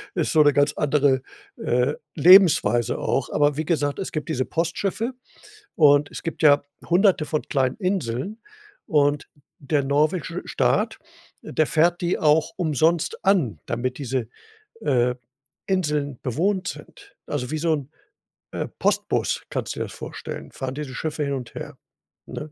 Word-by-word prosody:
ist 170 Hz, -4 st, 0 dB
so 155 Hz, -, +5 dB
'ne 145 Hz, -1 st, +4 dB
ganz 145 Hz, +1 st, +2 dB
andere, 140 Hz, -3 st, +2 dB, 0.4 s
äh, 125 Hz, +4 st, +1 dB, 0.2 s
Lebensweise 160 Hz, -, +6 dB
auch. 135 Hz, -, -1 dB
Aber 145 Hz, -1 st, +2 dB
wie 155 Hz, -, -2 dB
gesagt, 145 Hz, -2 st, 0 dB
es 190 Hz, -, -4 dB
gibt 155 Hz, +1 st, -4 dB
diese 130 Hz, -5 st, 0 dB
Postschiffe 195 Hz, +8 st, -2 dB, 0.6 s
und 145 Hz, -2 st, +5 dB
es -, -, -8 dB
gibt 165 Hz, -, -5 dB
ja 145 Hz, -1 st, +6 dB, 0.3 s
Hunderte 180 Hz, -2 st, +3 dB
von 155 Hz, 0 st, -1 dB
kleinen 130 Hz, -3 st, 0 dB
Inseln, 185 Hz, -, -2 dB, 0.5 s
und 145 Hz, -1 st, +1 dB, 0.3 s
der 145 Hz, 0 st, 0 dB
norwegische 150 Hz, +4 st, 0 dB
Staat, -, -, 0 dB, 0.4 s
der 155 Hz, -, 0 dB
fährt 170 Hz, +2 st, +2 dB
die 175 Hz, 0 st, 0 dB
auch 155 Hz, 0 st, +3 dB
umsonst 160 Hz, 0 st, +1 dB
an, 155 Hz, -, +2 dB
damit 125 Hz, +2 st, -3 dB
diese, 130 Hz, -4 st, -2 dB, 0.5 s
äh, 125 Hz, -1 st, +1 dB, 0.5 s
Inseln 150 Hz, -8 st, -1 dB
bewohnt 185 Hz, -, -1 dB
sind, 405 Hz, 0 st, -12 dB
also, 130 Hz, -3 st, -3 dB
wie 155 Hz, -, -1 dB
so 160 Hz, 0 st, +1 dB
'n, 145 Hz, -1 st, -4 dB, 0.6 s
äh, -, -, -3 dB
Postbus -, -, 0 dB
kannst -, -, -3 dB
du -, -, -7 dB
dir -, -, -1 dB
das -, -, -10 dB
vorstellen, -, -, -8 dB
fahren 130 Hz, 0 st, -5 dB
diese 145 Hz, -3 st, -6 dB
Schiffe 155 Hz, +1 st, -3 dB
hin 140 Hz, -, -1 dB
und 125 Hz, -4 st, -6 dB
her, -, -, -7 dB, 0.5 s
ne? 155 Hz, -, -7 dB
150 Hz, 150 wpm, -23 LUFS, 135-170 Hz, 0.6 s, Lebensweise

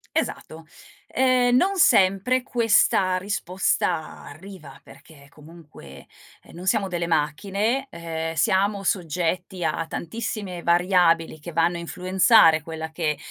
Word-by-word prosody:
Esatto. 160 Hz, +1 st, -4 dB, 0.4 s
Ehm, 255 Hz, -1 st, +2 dB
non 385 Hz, +9 st, +2 dB
sempre 215 Hz, -, +3 dB
questa 215 Hz, -6 st, +2 dB
risposta 185 Hz, -3 st, -2 dB
arriva, 170 Hz, 0 st, -12 dB
perché 140 Hz, 0 st, -17 dB
comunque, 150 Hz, -, -15 dB, 0.4 s
ehm, -, -, -18 dB
non 175 Hz, +2 st, -9 dB
siamo 195 Hz, +1 st, +1 dB
delle 175 Hz, -2 st, -3 dB
macchine, 195 Hz, -, -1 dB
ehm, 165 Hz, -1 st, -5 dB
siamo 195 Hz, +4 st, +1 dB
soggetti 180 Hz, +1 st, -2 dB
a 165 Hz, +1 st, -1 dB
tantissime 200 Hz, -2 st, -5 dB
variabili 170 Hz, -2 st, +2 dB
che 170 Hz, +3 st, -9 dB
vanno 170 Hz, +2 st, +1 dB
a -, -, -6 dB
influenzare 180 Hz, 0 st, +3 dB
quella 160 Hz, 0 st, -7 dB
che 160 Hz, -2 st, -2 dB
175 Hz, 115 wpm, -23 LUFS, 160-200 Hz, 0.4 s, sempre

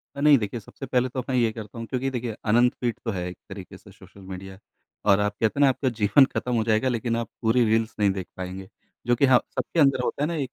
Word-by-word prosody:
अ, -, -, -7 dB
नहीं 150 Hz, -2 st, +7 dB
देखिए 115 Hz, +2 st, -4 dB
सबसे 135 Hz, +6 st, -10 dB
पहले 125 Hz, 0 st, +1 dB
तो 130 Hz, -, -4 dB
अब -, -, -15 dB
मैं 130 Hz, -, 0 dB
ये 115 Hz, -2 st, +2 dB
करता 110 Hz, 0 st, -9 dB
हूँ 115 Hz, -, -5 dB
क्योंकि 135 Hz, +1 st, -2 dB
देखिए 120 Hz, -4 st, -4 dB, 0.2 s
अनंत 120 Hz, +2 st, +4 dB
फ़ीड 120 Hz, -2 st, 0 dB
तो 115 Hz, -, 0 dB
है 90 Hz, -3 st, -3 dB
एक 90 Hz, -, -10 dB
तरीके 95 Hz, -2 st, -9 dB
से -, -, -17 dB
सोशल 100 Hz, -, -17 dB
मीडिया। 95 Hz, +1 st, -8 dB, 0.5 s
और 100 Hz, -1 st, +5 dB
आप 105 Hz, 0 st, 0 dB
कहते 110 Hz, +5 st, +1 dB
हैं 145 Hz, -, +6 dB
न -, -, +5 dB
आपका 130 Hz, 0 st, 0 dB
जीवन 115 Hz, +6 st, +5 dB
खत्म 125 Hz, -, -1 dB
हो 115 Hz, -, +2 dB
जाएगा 110 Hz, +3 st, +1 dB
लेकिन 115 Hz, -1 st, -1 dB
आप 115 Hz, -1 st, -3 dB
पूरी 115 Hz, +2 st, +3 dB
रील्स 110 Hz, +1 st, +1 dB
नहीं 100 Hz, -1 st, +4 dB
देख 95 Hz, -2 st, -5 dB
पाएँगे। 95 Hz, +1 st, -6 dB, 0.4 s
जो 120 Hz, -, +4 dB
कि 140 Hz, -, +3 dB
हाँ, 130 Hz, -2 st, +6 dB, 0.2 s
सबके 170 Hz, -, -2 dB
अंदर 135 Hz, -3 st, +4 dB
होता 145 Hz, -, -2 dB
है -, -, +1 dB
न 165 Hz, -, -2 dB
एक 130 Hz, -3 st, -3 dB
115 Hz, 275 wpm, -25 LUFS, 105-130 Hz, 0.5 s, नहीं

